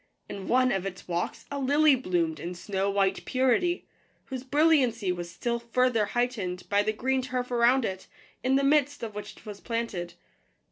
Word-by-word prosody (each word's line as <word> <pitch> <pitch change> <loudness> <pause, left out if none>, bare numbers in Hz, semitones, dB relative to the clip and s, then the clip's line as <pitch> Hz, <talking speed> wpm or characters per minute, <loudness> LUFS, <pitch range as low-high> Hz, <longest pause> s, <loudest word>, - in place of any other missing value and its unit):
In 195 -1 -7
one 255 0 +3
of 195 -2 0
its 185 -1 -8
walks 175 0 -3
a 285 - -3
lily 290 +3 +4
bloomed 175 -9 -1
in 175 +1 -5
snow 195 +2 -2
white 195 -1 +1
purity, 265 +8 +1 0.4
whose 260 -2 -6
brilliancy 265 - +3
was 175 -1 -4
still 235 +6 -2
further 235 -1 +1
heightened 210 -6 -2
by 205 0 +3
the 215 +1 0
green 260 +4 0
turf 250 -1 -3
around 240 +1 +4
it, 190 -2 -5 0.4
in 260 +1 +2
the 275 - +3
midst 285 -1 +2
of 220 -2 -4
which 210 0 -8
it - - -18
was 205 -2 -8
planted. 230 -7 -3
235 Hz, 180 wpm, -28 LUFS, 195-260 Hz, 0.4 s, lily